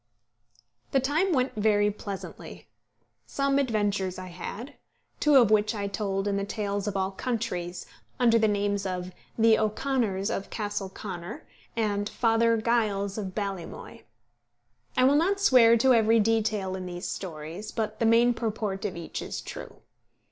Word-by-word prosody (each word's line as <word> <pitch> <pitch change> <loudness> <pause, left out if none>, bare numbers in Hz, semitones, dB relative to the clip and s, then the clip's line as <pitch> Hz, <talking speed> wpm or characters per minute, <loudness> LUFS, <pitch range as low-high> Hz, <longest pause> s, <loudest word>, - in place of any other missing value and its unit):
The 270 - +5
time 305 +9 +1
went 260 -4 +1
very 210 -1 +2
pleasantly. 200 -1 -8 0.6
Some 275 0 +1
adventures 205 -7 0
I 185 0 -7
had; 195 +8 -7 0.5
two 300 -2 +4
of 240 -5 +6
which 210 +1 +3
I 200 -1 -2
told 195 0 -2
in 200 -1 0
the 200 - -1
Tales 205 0 -3
of 200 -1 -1
All 190 0 0
Countries, 185 -6 -3 0.3
under 230 -2 +5
the 220 - +3
names 205 -1 0
of 180 -1 -4 0.3
The 225 -1 +5
O'Conors 215 -3 0
of 195 - -4
Castle 205 -2 -3
Conor, 190 0 -7 0.3
and 205 -2 0
Father 230 -1 +2
Giles 215 -3 0
of 190 -3 -5
Ballymoy. 195 -4 -5 1.0
I 255 - +5
will 275 +3 +5
not 385 +6 +2
swear 240 -11 +6
to 260 +3 +4
every 225 0 +4
detail 215 -3 +1
in 185 -1 -5
these 175 0 -5
stories, 170 +3 -6
but 215 -1 -3
the 230 - +3
main 235 +2 +5
purport 215 -4 -3
of 190 -4 -3
each 170 - -5
is - - -5
true. - - -9
210 Hz, 155 wpm, -27 LUFS, 195-230 Hz, 1.0 s, of